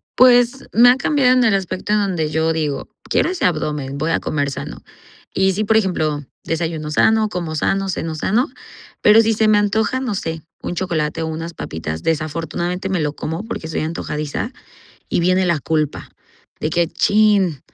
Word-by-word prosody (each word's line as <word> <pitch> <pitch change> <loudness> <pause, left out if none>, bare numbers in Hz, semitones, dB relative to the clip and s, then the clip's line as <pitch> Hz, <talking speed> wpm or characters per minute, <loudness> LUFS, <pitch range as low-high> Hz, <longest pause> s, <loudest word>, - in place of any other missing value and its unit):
Pues, 245 +1 +5
me 245 +2 +7
ha 250 - +6
cambiado 275 -3 +2
en 250 - +4
el 220 -4 +4
aspecto 190 +1 -3
en 210 - +3
donde 175 -6 -1
yo 160 +1 +1
digo: 150 -3 -2 0.2
"Quiero - - +2
ese 370 - -1
abdomen. 150 -5 -1
Voy 155 +3 -1
a - - +2
comer 140 -2 -1
sano", - - -7 0.5
y 190 0 +2
sí, 215 +3 -1
por 220 +1 +2
ejemplo, 155 -7 0 0.2
desayuno 160 -2 -3
sano, 220 +7 +3
como 170 -5 -4
sano, 195 +5 0
ceno 165 -3 -3
sano, 220 - +1 0.5
pero, 215 +2 +7
si 225 0 +2
se 215 +1 +2
me 215 -1 +5
antoja, 220 +5 +1
no 245 -6 -2
sé, 160 -4 -4 0.2
un 175 - -4
chocolate 165 -3 -1
o - - -2
unas 165 +1 -5
papitas, 80 0 -5
desafortunadamente 165 +4 -2
me 185 -3 0
lo 150 -1 -1
como, 165 +6 -4
porque 165 -8 -5
soy 160 - -2
antojadiza 155 - -3 0.6
y - - 0
viene 185 +1 +2
la 170 -4 +1
culpa 150 - -2 0.5
de 155 - -1
que, 170 0 +1
chin, 205 -8 +2
170 Hz, 185 wpm, -19 LUFS, 155-210 Hz, 0.6 s, me